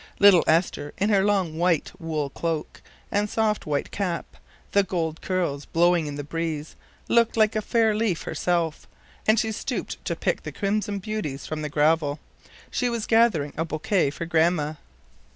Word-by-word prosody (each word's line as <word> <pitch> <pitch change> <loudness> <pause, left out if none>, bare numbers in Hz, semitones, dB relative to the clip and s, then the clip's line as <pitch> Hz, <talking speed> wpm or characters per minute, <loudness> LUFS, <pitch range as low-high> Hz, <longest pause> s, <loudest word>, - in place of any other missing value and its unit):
Little 200 -4 +7
Esther, 160 -3 +1
in 200 +2 +1
her 195 -2 +4
long 190 -6 +1
white 170 -3 +2
wool 155 -4 -2
cloak 165 -1 -3 0.3
and 205 +1 +1
soft 215 -4 0
white 145 -2 -1
cap, 180 -4 -2 0.5
the 200 - +5
gold 165 -4 -2
curls 170 -7 -1
blowing 170 -1 +2
in 145 - -5
the 145 - -4
breeze, 155 0 -4 0.3
looked 235 -1 +3
like 215 0 +4
a 215 - +1
fair 225 0 +2
leaf 210 -5 0
herself, 170 -3 -1 0.4
as 215 0 +5
she 220 - -2
stooped 250 +4 -4
to - - -1
pick - - -1
the - - -6
crimson 205 0 -1
beauties 195 -9 -4
from 155 -1 -4
the 150 - -3
gravel. 150 0 +2 0.5
She 250 - 0
was 235 -2 -2
gathering 225 -11 +3
a 160 - 0
bouquet 160 +1 0
for 170 +4 -5
Grandma. 160 -2 +2
175 Hz, 170 wpm, -25 LUFS, 155-210 Hz, 0.5 s, Little